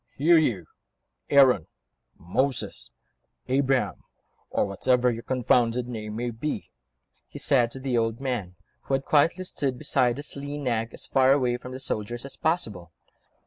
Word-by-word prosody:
"Here, 165 Hz, +4 st, +5 dB
you... 110 Hz, -, 0 dB, 0.6 s
Aaron, 135 Hz, -, +5 dB, 0.5 s
Moses, 130 Hz, +10 st, -1 dB, 0.6 s
Abraham, 135 Hz, 0 st, +1 dB, 0.5 s
or -, -, +1 dB
whatever 125 Hz, +5 st, +2 dB
your 115 Hz, 0 st, -5 dB
confounded 125 Hz, -1 st, +1 dB
name 110 Hz, -3 st, -6 dB
may 120 Hz, +1 st, -2 dB
be," 130 Hz, +7 st, -4 dB, 0.6 s
he -, -, -10 dB
said 125 Hz, -4 st, +3 dB
to 135 Hz, -, -8 dB
the 130 Hz, -3 st, 0 dB
old 115 Hz, 0 st, -1 dB
man, 120 Hz, -10 st, -3 dB, 0.3 s
who 135 Hz, -, +1 dB
had 135 Hz, -, -3 dB
quietly 165 Hz, +5 st, +3 dB
stood 135 Hz, -8 st, -2 dB
beside 125 Hz, 0 st, +1 dB
his 145 Hz, -, -7 dB
lean 145 Hz, +1 st, -5 dB
nag, 115 Hz, -3 st, -1 dB
as -, -, -7 dB
far 135 Hz, 0 st, +4 dB
away 125 Hz, -3 st, +1 dB
from 125 Hz, +1 st, -10 dB
the 130 Hz, -, -6 dB
soldiers 120 Hz, -1 st, -4 dB
as 140 Hz, -, -7 dB
possible. 105 Hz, -, -2 dB
125 Hz, 150 wpm, -26 LUFS, 115-140 Hz, 0.6 s, Here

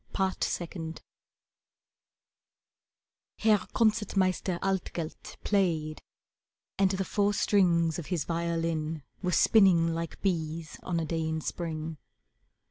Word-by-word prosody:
Part 190 Hz, -1 st, 0 dB
Second 165 Hz, -2 st, -4 dB, 2.3 s
Herr 215 Hz, -2 st, +4 dB
Concert 215 Hz, -3 st, +1 dB
Meister 185 Hz, -1 st, +1 dB
Altgelt 185 Hz, -4 st, -3 dB
played, 160 Hz, -7 st, 0 dB, 0.8 s
And 195 Hz, -1 st, +5 dB
the 190 Hz, 0 st, -1 dB
four 205 Hz, +1 st, +1 dB
strings 170 Hz, -6 st, +3 dB
of 165 Hz, -, -7 dB
his 175 Hz, -6 st, -1 dB
violin 165 Hz, -2 st, -1 dB, 0.2 s
Were 180 Hz, -2 st, 0 dB
spinning 175 Hz, -5 st, +5 dB
like 165 Hz, 0 st, -4 dB
bees 160 Hz, -4 st, -2 dB
on 170 Hz, -2 st, -1 dB
a 165 Hz, -, -1 dB
day 165 Hz, +1 st, -2 dB
in 160 Hz, 0 st, -1 dB
Spring. 160 Hz, -1 st, -4 dB
170 Hz, 110 wpm, -29 LUFS, 160-190 Hz, 2.3 s, And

